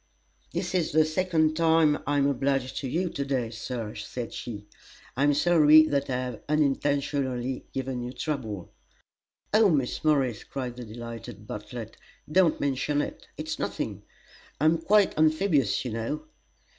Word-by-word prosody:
"This 175 +2 -3
is 175 -5 0
the 155 0 +5
second 155 -1 +1
time 160 -2 +4
I 145 0 +1
am 140 - +3
obliged 135 -1 0
to 135 - -3
you 175 +8 0
to 140 - -2
day, 130 -5 -1
Sir," 115 -1 -5
said 115 +3 -6
she. 105 -4 -6 0.5
"I 130 - -2
am 145 0 +4
sorry 155 -1 +7
that 140 -3 -1
I 130 - 0
have 125 -3 -4
unintentionally 140 -3 0
given 130 -2 -3
you 120 +1 -5
trouble." 125 - -4 0.8
"Oh, 215 -1 +6
Miss 140 -7 0
Morris," 135 -8 +2
cried 125 -3 -5
the 125 - -7
delighted 115 -2 -8
Bartlett, 110 +2 -7 0.3
"don't 180 -2 +4
mention 145 +1 0
it! - - -4
It's - - -4
nothing; - - -3 0.6
I 150 - +1
am 160 +1 +4
quite 200 +4 +3
amphibious, 155 - +2
you 125 - -3
know." 115 +7 -3
140 Hz, 155 wpm, -27 LUFS, 125-155 Hz, 0.8 s, sorry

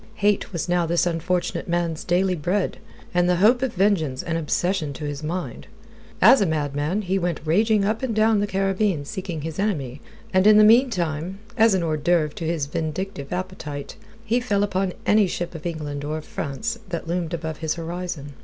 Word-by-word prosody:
Hate 205 0 +1
was 170 -3 -3
now 175 -1 +1
this 170 +1 +2
unfortunate 175 +1 -1
man's 170 -2 -1
daily 180 +2 +2
bread, 180 +4 -1 0.3
and 175 0 +3
the 180 - +4
hope 220 +8 +4
of 260 -5 -1
vengeance 175 -9 +1
an 165 - -2
obsession 165 0 -1
to 150 - -6
his 145 0 -4
mind. 170 +3 -4 0.6
As 255 +2 +8
a 195 - +3
madman 150 +5 -1
he 190 +1 0
went 175 -2 -1
raging 210 +5 +3
up 215 +2 0
and 250 -5 -2
down 220 0 +4
the 205 - 0
Caribbean 195 -4 0
seeking 175 0 -5
his 160 +2 -5
enemy, 145 - -2 0.3
and 185 +2 +4
in 215 0 +8
the 215 - +8
meantime, 190 - +3 0.2
as 225 -3 +5
an 180 - 0
hors 155 -2 0
d'oeuvre 155 -1 +1
to 165 - -5
his 160 -3 0
vindictive 155 0 -4
appetite, 180 -6 -5 0.3
he 235 +2 +2
fell 205 -5 0
upon 190 -2 -1
any 210 -2 +4
ship 175 0 -4
of 165 0 -5
England 150 -4 -4
or 150 +2 -2
of 155 - -8
France 220 +11 -4
that 170 -2 -4
loomed 170 0 -1
above 160 -1 -5
his 160 -1 -2
horizon. 165 -4 -5
175 Hz, 190 wpm, -23 LUFS, 155-195 Hz, 0.6 s, As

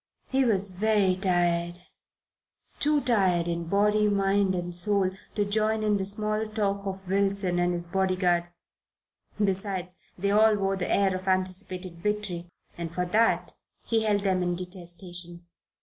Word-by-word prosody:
He 265 0 +3
was 200 -5 +1
very 200 -1 +2
tired, 175 -2 +1 1.0
too 295 0 +2
tired 190 -9 +2
in 170 0 -2
body, 210 +3 +3
mind 195 -1 +2
and 175 0 -3
soul 190 +1 +1 0.2
to 205 - +1
join 215 +1 +1
in 210 -1 +2
the 190 -1 -2
small 215 +1 -1
talk 200 -2 -1
of 190 0 -6
Wilson 195 -2 +1
and 175 0 +2
his 175 -1 -3
bodyguard. 185 -1 +1 0.9
Besides, 190 -2 -1 0.2
they 200 +2 0
all 215 +1 +5
wore 195 -1 0
the 185 -2 -3
air 195 -1 +3
of 185 +1 -6
anticipated 185 -2 -2
victory, 205 -4 -2 0.3
and 170 -1 -5
for 180 +2 -1
that 220 +6 +2 0.3
he 225 -1 +1
held 210 -2 +1
them 190 -2 +1
in 175 0 0
detestation. 175 -1 -8
190 Hz, 150 wpm, -27 LUFS, 180-205 Hz, 1.0 s, all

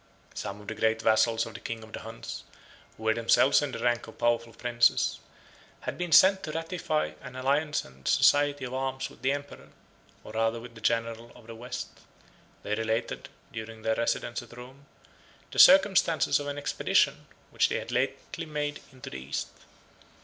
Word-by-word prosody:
Some 100 +1 -5
of 105 - -14
the - - -3
great 110 +1 +1
vassals 115 +1 +3
of 115 - -9
the - - -8
king 115 -1 -6
of 110 - -14
the - - -5
Huns, 115 +1 -8 0.5
who 110 - -12
were 110 0 +3
themselves 115 +5 +4
in 145 -2 -2
the 115 - -5
rank 120 0 0
of - - -13
powerful 115 -1 +1
princes, 120 +1 +2 0.6
had - - -4
been 175 -1 -4
sent 190 +3 +7
to 155 - -5
ratify 165 -1 -2
an 125 -1 -10
alliance 145 +4 0
and 65 0 -13
society 145 -1 +4
of 125 - -6
arms 135 0 -3
with - - -18
the 130 +2 +2
emperor, 145 0 -6 0.5
or - - -10
rather 115 +1 0
with 115 0 -11
the 110 - -13
general 115 +1 -1
of 120 - -16
the 115 - -9
West. 120 +2 -7 0.6
They 105 - -2
related, 110 +2 -2 0.2
during 110 0 -7
their 110 - +2
residence 115 +1 -1
at 120 0 -14
Rome, 130 +3 -12 0.6
the - - -3
circumstances 195 - +6
of 145 - -5
an 145 0 -4
expedition, 145 - +1 0.2
which - - +2
they - - 0
had - - -6
lately 135 +6 -2
made 145 -1 -3
into 130 -1 -10
the 65 - -6
East. 65 +1 -4
120 Hz, 185 wpm, -28 LUFS, 115-145 Hz, 0.6 s, sent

